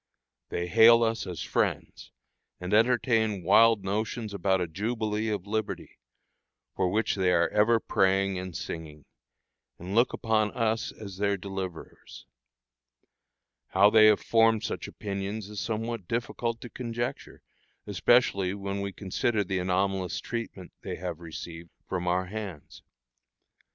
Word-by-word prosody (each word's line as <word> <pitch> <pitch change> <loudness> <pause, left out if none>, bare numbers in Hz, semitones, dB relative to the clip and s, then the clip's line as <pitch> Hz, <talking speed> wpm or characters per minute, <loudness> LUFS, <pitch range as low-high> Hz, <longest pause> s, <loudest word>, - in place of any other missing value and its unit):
They 85 - -2
hail 115 +5 +7
us 115 0 -1
as 90 -3 -5
friends, - - -2 0.5
and 90 +3 -4
entertain 110 -3 +2
wild 110 +3 +5
notions 105 +2 -3
about 95 0 +1
a 90 - -1
jubilee 110 +4 -2
of 100 -3 -3
liberty, 110 0 -4 0.8
for 95 -1 +1
which 110 +4 +1
they 95 -2 +1
are 85 -1 +3
ever 110 +2 +3
praying 95 -2 +1
and 90 -2 -6
singing, 75 -3 -7 0.7
and 90 +3 -7
look 120 +3 +4
upon 110 -2 0
us 115 -1 0
as 100 -3 -10
their 100 0 +1
deliverers. 95 -3 -8 1.4
How 100 +1 +5
they 110 -1 +7
have 105 -1 +4
formed 115 -1 +3
such - - -4
opinions 100 +1 -5
is 105 -1 -6
somewhat 115 -3 -3
difficult 115 0 -2
to 120 - -8
conjecture, 120 -1 -5 0.4
especially 100 -2 +2
when 100 0 -4
we 100 0 -3
consider 105 +3 -1
the 95 -1 -2
anomalous 95 0 0
treatment 115 -6 -6
they - - -5
have 85 -2 -5
received 85 0 -8 0.2
from 90 -1 -3
our 90 +1 +1
hands. 95 -6 -8
100 Hz, 135 wpm, -28 LUFS, 95-110 Hz, 1.4 s, hail